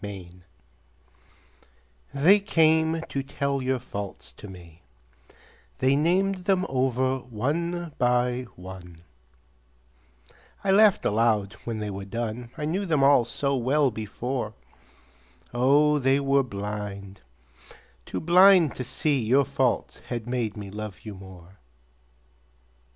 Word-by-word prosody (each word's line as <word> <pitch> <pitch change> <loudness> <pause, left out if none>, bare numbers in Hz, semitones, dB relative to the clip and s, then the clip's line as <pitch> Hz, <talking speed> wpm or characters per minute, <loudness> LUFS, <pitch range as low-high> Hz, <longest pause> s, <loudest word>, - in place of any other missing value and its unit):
Faults 95 -4 -8 1.8
They 170 +9 +5
came 160 -4 +2
to 140 - -3
tell 140 0 -2
your 130 0 0
faults 100 -5 -8
to 105 - -12
me, 85 -3 -13 1.0
They 130 +1 +2
named 185 +5 +1
them 190 -1 +2
over 130 0 0
one 155 +8 -3
by 125 0 +1
one; 90 -2 -11 1.6
I 195 - +2
laughed 205 0 +5
aloud 105 -2 +1
when 115 -2 -3
they 105 -1 -4
were 95 0 -6
done, 115 +3 -5
I 150 - -3
knew 190 +6 -2
them 155 -5 +2
all 135 -3 +5
so 140 +3 -1
well 135 +2 +2
before, 110 +1 -4 1.0
Oh, 145 +5 +3
they 135 +1 +2
were 140 0 +2
blind, 100 -3 -6 0.8
too - - -5
blind 180 -1 +6
to 125 - -3
see 130 +1 -1
Your 130 +5 +3
faults 135 -2 -1
had 120 -3 -4
made 120 -3 -3
me 100 -2 -7
love 105 -2 -7
you 105 - -7
more. 95 -1 -14
125 Hz, 120 wpm, -25 LUFS, 105-150 Hz, 1.8 s, blind